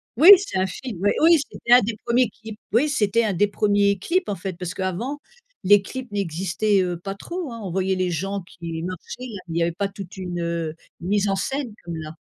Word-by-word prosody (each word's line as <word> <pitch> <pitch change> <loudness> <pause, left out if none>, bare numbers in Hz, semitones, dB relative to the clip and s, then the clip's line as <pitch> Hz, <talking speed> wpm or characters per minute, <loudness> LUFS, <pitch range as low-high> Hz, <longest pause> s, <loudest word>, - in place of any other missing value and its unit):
Oui 320 - +7
c'est 350 - -3
un 190 - +1
film, 200 -2 -7
ouais, 205 - +3
oui, 330 -1 +7
c'était 240 - +1
un 250 - +9
des 220 +1 -3
1ers 240 -1 +3
clips, 220 +1 -11
oui 245 +8 +3
c'était 230 -4 +2
un 205 - 0
des 205 +4 +3
1ers 205 -1 +2
clips 360 - 0
en 200 - -1
fait 190 +1 -5
parce 180 -1 -4
qu'avant, 190 +10 -3 0.5
les 205 +1 +7
clips 260 +5 -7
n'existaient, 195 +2 0
heu, 175 -1 -2
pas 195 +3 -6
trop 345 - -6
hein, 230 - -7
on 185 - -4
voyait 190 +1 0
les 185 -1 0
gens 195 +4 -2
qui 165 -1 -6
marchaient, 185 -1 -6 0.3
il 165 - -3
y - - +2
avait 170 - +1
pas 200 +3 -1
toute 195 -2 -9
une, 180 -2 -4
heu, 170 -2 -2 0.3
mise 200 +3 +1
en 195 - +1
scène 265 +2 -3
comme 170 -1 -6
là. 155 0 -7
195 Hz, 225 wpm, -23 LUFS, 180-230 Hz, 0.5 s, un